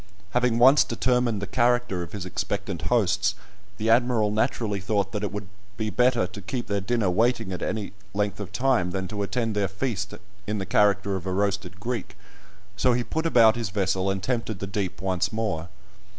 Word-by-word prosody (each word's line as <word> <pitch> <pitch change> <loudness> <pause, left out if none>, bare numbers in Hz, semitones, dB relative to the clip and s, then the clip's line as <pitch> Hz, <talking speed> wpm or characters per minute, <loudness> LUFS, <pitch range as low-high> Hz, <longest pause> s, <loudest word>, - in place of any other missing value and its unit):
Having 125 -1 +2
once 130 +5 +7
determined 120 -3 0
the - - 0
character 120 -6 +1
of 85 - -6
his 100 -3 -5
expectant 100 -1 -3
hosts, 105 -2 +2 0.4
the 110 - -2
Admiral 115 -3 +3
naturally 105 -1 0
thought 100 0 0
that 105 - -3
it 105 - -2
would 105 -1 -5 0.3
he 110 -1 -2
better 125 -3 +3
to 100 +3 -9
keep 120 +5 -4
their 100 -1 -1
dinner 110 +1 0
waiting 110 -1 +1
any 105 +4 -3 0.2
length 100 0 -1
of 100 -3 -6
time 125 -9 +2
than 95 0 -3
to 105 0 -4
attend 115 +1 -1
their 100 -1 +1
feast 105 0 -3 0.3
in 105 +1 -1
the 95 - -3
character 100 0 +2
of 95 0 -5
a - - -1
roasted 95 -2 -1
Greek, 115 +1 -4 0.6
so 125 +4 +3
he 120 0 +1
put 160 +6 -1
about 115 -7 +6
his 115 -4 -2
vessel, 95 0 0
and 95 -1 -2
tempted 115 -4 -1
the 100 - -4
deep 95 -2 -3
once 95 -2 0
more. 95 -7 -2
105 Hz, 190 wpm, -26 LUFS, 95-120 Hz, 0.6 s, once